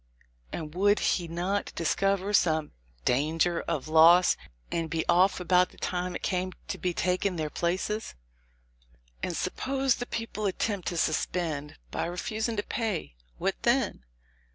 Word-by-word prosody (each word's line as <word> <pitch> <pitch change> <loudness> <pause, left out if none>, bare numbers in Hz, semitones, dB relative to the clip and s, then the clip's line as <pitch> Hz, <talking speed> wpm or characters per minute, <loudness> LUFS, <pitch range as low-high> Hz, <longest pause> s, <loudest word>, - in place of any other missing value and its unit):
And 155 -2 -5
would 205 +3 +4
he 175 -2 +1
not 180 +5 -2
discover 195 +4 +1
some 160 -5 +3 0.3
'danger 160 +6 +2
of 145 0 -2
loss,' 165 +3 +7 0.4
and 165 -1 -1
be 165 0 -2
off 185 +3 +4
about 180 0 +3
the - - -20
time 180 0 -2
it - - -6
came 185 0 -1 0.2
to - - -3
taking 180 +1 0
their 155 -2 -3
places? 185 - -2 1.1
"And - - -2
suppose 270 -1 0
the 245 - -4
people 220 -2 -3
attempt 195 0 -2
to 175 - -2
suspend, 155 -2 -1 0.2
by - - -1
refusing 215 +6 -2
to 205 - 0
pay; 220 - -2 0.2
what - - 0
then? - - +1
180 Hz, 140 wpm, -28 LUFS, 165-200 Hz, 1.1 s, loss